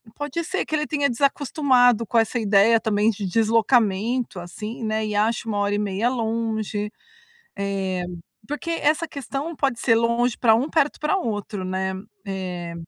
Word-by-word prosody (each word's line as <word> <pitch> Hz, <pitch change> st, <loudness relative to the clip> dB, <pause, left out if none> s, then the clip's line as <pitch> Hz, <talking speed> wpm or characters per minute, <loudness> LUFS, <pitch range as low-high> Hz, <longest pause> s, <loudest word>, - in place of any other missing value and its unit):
pode 295 Hz, +4 st, -3 dB
ser 380 Hz, +4 st, -2 dB
que 310 Hz, -, -2 dB
ele 300 Hz, 0 st, -1 dB
tenha 285 Hz, -2 st, +1 dB
desacostumado 255 Hz, -3 st, +3 dB
com 230 Hz, -, 0 dB
essa 225 Hz, +2 st, +2 dB
ideia 210 Hz, +1 st, +5 dB
também 215 Hz, -1 st, +2 dB
de 205 Hz, -1 st, -5 dB
deslocamento 225 Hz, +1 st, +2 dB
assim, 210 Hz, +7 st, -7 dB
né, 220 Hz, 0 st, -1 dB
e 210 Hz, -1 st, -3 dB
acha 220 Hz, +2 st, +1 dB
1 210 Hz, -2 st, -1 dB
hora 205 Hz, 0 st, +1 dB
e -, -, 0 dB
meia 205 Hz, +3 st, 0 dB
longe, 220 Hz, -3 st, -2 dB, 0.7 s
eh, 195 Hz, -2 st, -2 dB, 0.4 s
porque 295 Hz, +3 st, -4 dB
essa 330 Hz, 0 st, +1 dB
questão 285 Hz, +2 st, -5 dB
pode 270 Hz, -5 st, 0 dB
ser 230 Hz, -, +3 dB
longe 235 Hz, +1 st, +2 dB
para 225 Hz, -3 st, +5 dB
um 250 Hz, +5 st, 0 dB
perto 300 Hz, -3 st, +1 dB
para 305 Hz, +6 st, +1 dB
outro, 205 Hz, -, -3 dB
né, 190 Hz, +1 st, -2 dB, 0.3 s
eh. 180 Hz, -3 st, -4 dB
225 Hz, 165 wpm, -23 LUFS, 205-265 Hz, 0.7 s, ideia